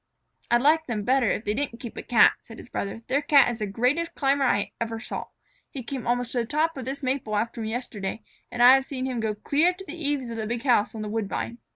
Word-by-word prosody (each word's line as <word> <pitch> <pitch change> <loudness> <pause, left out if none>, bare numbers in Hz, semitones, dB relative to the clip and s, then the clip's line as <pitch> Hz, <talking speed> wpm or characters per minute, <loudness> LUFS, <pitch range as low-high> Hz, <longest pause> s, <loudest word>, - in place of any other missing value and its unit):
"I'd 240 +1 +3
like 315 +2 +4
them 220 -4 -2
better 255 -1 +2
if 215 - -2
they 210 - 0
didn't 250 -1 -3
keep 235 -2 -8
a - - -5
Cat," 235 -4 +5
said 225 - -13
his - - -12
brother. 200 -3 -4
"Their 275 +3 +1
Cat 285 -4 +5
is 235 - -6
the 210 - -2
greatest 255 +11 0
climber 275 -1 +2
I 205 -5 +1
ever 225 -1 -2
saw. 225 - -5 0.4
He 265 -4 -7
came 255 0 -5
almost 245 0 0
to 250 - 0
the 235 - 0
top 315 +4 0
of 265 -3 -6
this 275 +2 -5
maple 255 -5 -1
after 230 +2 -2
me 220 - -3
yesterday, 220 -3 -4 0.3
and 240 - +1
I 250 +1 +10
have 270 0 +3
seen 260 -2 -4
him 255 -2 -2
go 220 -1 -1
clear 295 - +2
to 385 +1 -10
the 310 - -7
eaves 290 -7 -2
of 230 - -5
the 220 -1 -3
big 235 +1 -3
house 235 -5 +2
on 215 - -4
the - - -4
woodbine." 225 +2 -3
245 Hz, 260 wpm, -26 LUFS, 225-275 Hz, 0.4 s, I